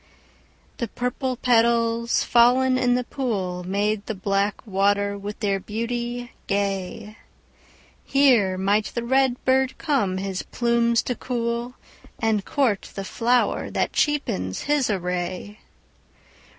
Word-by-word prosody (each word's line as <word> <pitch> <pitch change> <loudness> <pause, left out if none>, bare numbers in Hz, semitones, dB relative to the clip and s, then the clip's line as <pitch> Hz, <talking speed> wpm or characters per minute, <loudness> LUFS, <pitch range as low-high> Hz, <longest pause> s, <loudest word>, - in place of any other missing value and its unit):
The 235 - -1
purple 250 +3 -2
petals, 235 -1 +2
fallen 250 +2 +4
in 250 -1 +2
the 250 - 0
pool, 195 -9 -3
Made 205 +3 -1
the 220 - -3
black 195 +3 -1
water 200 0 +1
with 200 +1 -7
their 200 -2 +1
beauty 240 +3 -4 0.2
gay; 200 +2 -2 0.9
Here 245 -9 +3
might 200 +3 +2
the 235 - -1
red 260 0 +1
bird 260 0 +2
come 265 - 0
his 190 -1 -3
plumes 235 -1 +1
to 250 - -1
cool, 240 0 -3 0.4
And 220 -3 0
court 235 -7 0
the 195 - -4
flower 240 +5 +1
that - - -1
cheapens 95 - 0
his 290 -4 +1
array. 180 +2 -3
230 Hz, 120 wpm, -24 LUFS, 200-245 Hz, 0.9 s, fallen